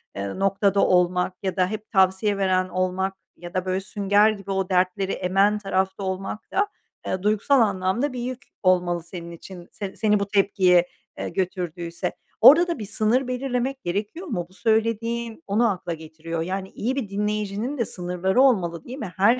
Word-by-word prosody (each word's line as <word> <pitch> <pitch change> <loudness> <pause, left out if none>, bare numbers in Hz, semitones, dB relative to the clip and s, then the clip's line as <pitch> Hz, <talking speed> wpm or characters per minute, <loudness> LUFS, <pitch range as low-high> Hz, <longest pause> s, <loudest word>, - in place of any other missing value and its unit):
eee, 100 - -4
noktada 195 0 +2
olmak 180 0 +2
ya 190 0 -1
da 185 -1 +2
hep 215 +2 -6
tavsiye 190 +1 +3
veren 185 -1 +1
olmak 185 +1 -1 0.2
ya 175 0 -10
da 185 0 -1
böyle 185 0 0
sünger 205 +2 +3
gibi 200 -2 -5
o 190 -1 -1
dertleri 185 +1 +1
emen 195 +3 +2
tarafta 190 -1 -1
olmak 190 +2 -4
da, 410 +2 +2 0.4
eee, 185 - -2
duygusal 215 +6 +3
anlamda 200 +6 +1
bir 250 - -4
yük 250 +1 -4 0.2
olmalı 175 -2 +2
senin 170 0 -8
için 175 +1 -11
se 195 -2 -6
seni 210 -2 +2
bu 200 - -2
tepkiye, 190 -3 +3 0.3
eee, - - -3
götürdüyse. 175 -2 -3 0.3
Orada 320 +10 +9
da 335 -8 -2
bir 210 - -4
sınır 220 +5 +1
belirlemek 255 +1 -2
gerekiyor 210 - -3
mu? 175 - -2
Bu 185 - -21
söylediğin 230 +4 -1
onu 220 +4 +3
akla 180 -3 -3
getiriyor. 160 +1 -6
Yani, 190 +2 -3
iyi 250 +5 -2
bir 255 -7 -3
dinleyicinin 210 +5 -2
de 235 - 0
sınırları 180 +5 0
olmalı 175 - +2
değil 255 +2 -8
mi? 200 -10 -6
Her 230 +6 +4
195 Hz, 175 wpm, -24 LUFS, 185-220 Hz, 0.4 s, Orada